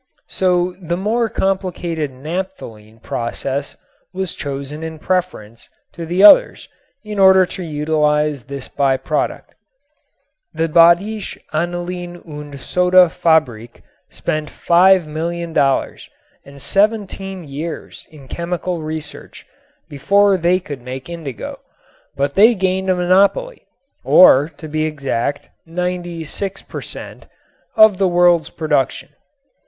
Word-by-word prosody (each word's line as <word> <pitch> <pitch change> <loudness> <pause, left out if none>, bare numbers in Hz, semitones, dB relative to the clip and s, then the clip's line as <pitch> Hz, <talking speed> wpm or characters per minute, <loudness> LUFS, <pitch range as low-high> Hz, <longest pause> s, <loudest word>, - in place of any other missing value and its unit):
So 180 -1 +1
the 170 0 -3
more 225 +4 0
complicated 180 -6 -2
napthalene 130 - -7
process 135 +4 -4 0.3
was 190 -2 -4
chosen 140 +1 -6
in 160 0 -6
preference 155 - -3 0.2
to 170 -1 -7
the 180 +4 +1
others - - +6 0.4
in 210 -1 -6
order 190 -1 +6
to 185 - -8
utilize 150 -3 0
this 140 -1 -7
by 135 -2 +1
product. - - -3 1.0
The 165 0 0
Badische 170 +6 +3 0.2
Anilin 175 +1 -4
und 145 -2 -9
Soda 180 +4 +4
Fabrik 125 -10 0 0.3
spent 155 -1 -3
$5,000,000 170 -4 +1 0.4
and 140 0 -14
seventeen 195 - -1
years 150 +4 -7
in 145 -4 -15
chemical 175 +1 -4
research 155 -1 -8 0.4
before 200 +8 +2
they 180 +1 +2
could 145 -7 -8
make 130 +4 -8
indigo, 155 -8 -7 0.6
but 140 +1 -1
they 225 +4 +5
gained 190 0 -1
a 185 - +3
monopoly 195 - +1 0.4
(or, 150 -4 +6
to 160 - -9
be 155 +1 -2
exact, 140 -3 -3 0.2
ninety 175 0 -4
six 195 +5 -5
per - - -8
cent.) - - -9 0.5
of 215 -4 +6
the 195 - +3
world's 175 -2 +3
production. 150 -4 -1
170 Hz, 115 wpm, -18 LUFS, 150-185 Hz, 1.0 s, others